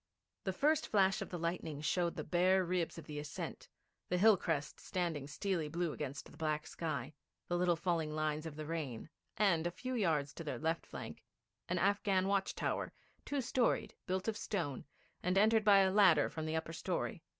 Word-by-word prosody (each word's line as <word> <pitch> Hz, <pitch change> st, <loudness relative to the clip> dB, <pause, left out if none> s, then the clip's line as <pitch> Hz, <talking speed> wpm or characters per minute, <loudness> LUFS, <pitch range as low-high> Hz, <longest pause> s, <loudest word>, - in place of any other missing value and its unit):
The 190 Hz, -, +1 dB
first 295 Hz, +10 st, +2 dB
flash 195 Hz, -2 st, +3 dB
of -, -, -4 dB
the 175 Hz, -, -4 dB
lightning 165 Hz, -3 st, -3 dB
showed 170 Hz, +3 st, 0 dB
the -, -, -3 dB
bare 185 Hz, +1 st, +3 dB
ribs 175 Hz, -1 st, -1 dB
of 165 Hz, -, -8 dB
the 150 Hz, -1 st, -5 dB
ascent, 145 Hz, -1 st, -6 dB, 0.4 s
the 180 Hz, -, +2 dB
hill 215 Hz, +3 st, +7 dB
crest 160 Hz, -5 st, -2 dB
standing 165 Hz, -6 st, -2 dB
steely 175 Hz, 0 st, -1 dB
blue 170 Hz, +1 st, -1 dB
against 145 Hz, -2 st, -5 dB
the -, -, -15 dB
black 155 Hz, -1 st, -1 dB
sky, 150 Hz, -4 st, -4 dB, 0.3 s
the 175 Hz, -, 0 dB
little 175 Hz, -1 st, +3 dB
falling 165 Hz, -2 st, 0 dB
lines 155 Hz, 0 st, -1 dB
of 155 Hz, -, -7 dB
the 155 Hz, 0 st, -5 dB
rain, 150 Hz, -6 st, -4 dB, 0.3 s
and, 175 Hz, -6 st, +3 dB
a -, -, 0 dB
few 255 Hz, +9 st, -5 dB
yards 160 Hz, -, +1 dB
to 165 Hz, -, -7 dB
their 150 Hz, -, -3 dB
left 160 Hz, +2 st, -1 dB
flank, -, -, -8 dB, 0.5 s
an 180 Hz, -, +1 dB
Afghan 195 Hz, 0 st, +2 dB
watch 195 Hz, -1 st, +1 dB
tower, -, -, -1 dB, 0.3 s
two 285 Hz, -1 st, -1 dB
storied, 245 Hz, 0 st, +1 dB
built 185 Hz, +1 st, -1 dB
of 220 Hz, -, 0 dB
stone, 170 Hz, -12 st, -3 dB, 0.4 s
and 180 Hz, +2 st, +1 dB
entered 220 Hz, +2 st, +5 dB
by 200 Hz, -2 st, +7 dB
a 190 Hz, -1 st, +3 dB
ladder 185 Hz, -7 st, +5 dB
from 160 Hz, -1 st, -4 dB
the 160 Hz, -, -1 dB
upper 160 Hz, 0 st, -3 dB
story. -, -, -2 dB
175 Hz, 195 wpm, -35 LUFS, 155-195 Hz, 0.5 s, hill